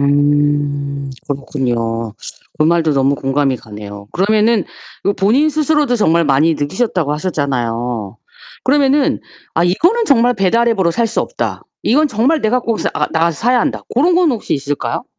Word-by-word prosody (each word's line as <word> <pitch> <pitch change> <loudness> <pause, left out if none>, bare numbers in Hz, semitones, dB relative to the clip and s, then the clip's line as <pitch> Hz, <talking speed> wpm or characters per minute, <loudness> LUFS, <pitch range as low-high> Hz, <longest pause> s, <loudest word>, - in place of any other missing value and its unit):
음 145 -1 +1 0.2
그렇군요. 120 -5 -2 0.5
그 155 - +3
말도 165 -2 +2
너무 135 0 +2
공감이 135 -1 0
가네요. 105 -2 -10
그러면은 215 +3 +2 0.4
그 200 - +1
본인 250 +11 +2
스스로도 300 -4 +1
정말 170 -5 +2
많이 150 +3 +3
느끼셨다고 160 0 -1
하셨잖아요. 120 - -2 0.5
그러면은 280 0 +2 0.3
'아 165 - +2
이거는 345 - +2
정말 245 -4 +3
배달앱으로 195 -1 +2
살 235 +3 +1
수 225 - -1
없다. - - -4 0.2
이건 300 +6 +3
정말 260 +7 +1
내가 235 +3 +1
꼭 230 -2 -2
사 - - -1
아 - - 0
나가서 165 -1 0
사야 245 +1 +2
한다.' - - -2
고런 330 +8 +2
건 350 -4 +3
혹시 230 - -2
있을까요? 145 0 -3
170 Hz, 335 characters per minute, -16 LUFS, 140-235 Hz, 0.5 s, 그